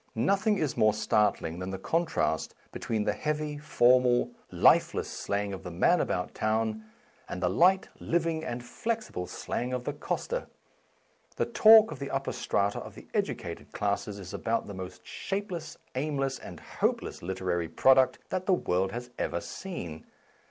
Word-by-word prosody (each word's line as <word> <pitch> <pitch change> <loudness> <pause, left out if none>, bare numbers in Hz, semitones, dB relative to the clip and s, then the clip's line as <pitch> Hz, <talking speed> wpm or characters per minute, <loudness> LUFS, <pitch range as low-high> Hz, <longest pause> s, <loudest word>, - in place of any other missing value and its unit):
Nothing 200 - +2
is 155 -7 -1
more 110 -1 +4
startling 105 -6 +1
than 90 0 -4
the 95 - -3
contrast 160 - 0 0.2
between 110 -2 -2
the 105 - +1
heavy, 150 +4 -2
formal, 125 -4 +4 0.2
lifeless - - +4
slang 100 0 -2
of 95 - -6
the 90 - -7
man 95 - +3
about 90 0 -2
town 110 0 -1 0.4
and 90 - -4
the 90 -1 +1
light, 185 - +4
living, 165 -1 0
and 120 -5 -4
flexible 220 - -3
slang 125 +1 -3
of 125 -1 -2
the 145 - -3
coster. 485 - -3 0.9
The - - +1
talk 220 0 +7
of - - -7
the 140 - -4
upper 135 0 -2
strata 100 0 0
of - - -9
the - - -13
educated - - -3
classes 100 0 -1
is 95 -3 -8
about 115 0 -1
the 100 - -7
most 95 -1 -8
shapeless, 190 -5 -4 0.2
aimless, 135 -1 -1
and 85 -3 -9
hopeless - - -2
literary 90 -2 -2
product 130 +9 +5
that 185 0 -2
the 190 - +5
world 95 - +1
has 125 +2 -6
ever 85 - -1
seen. 85 - -7
120 Hz, 160 wpm, -29 LUFS, 95-160 Hz, 0.9 s, talk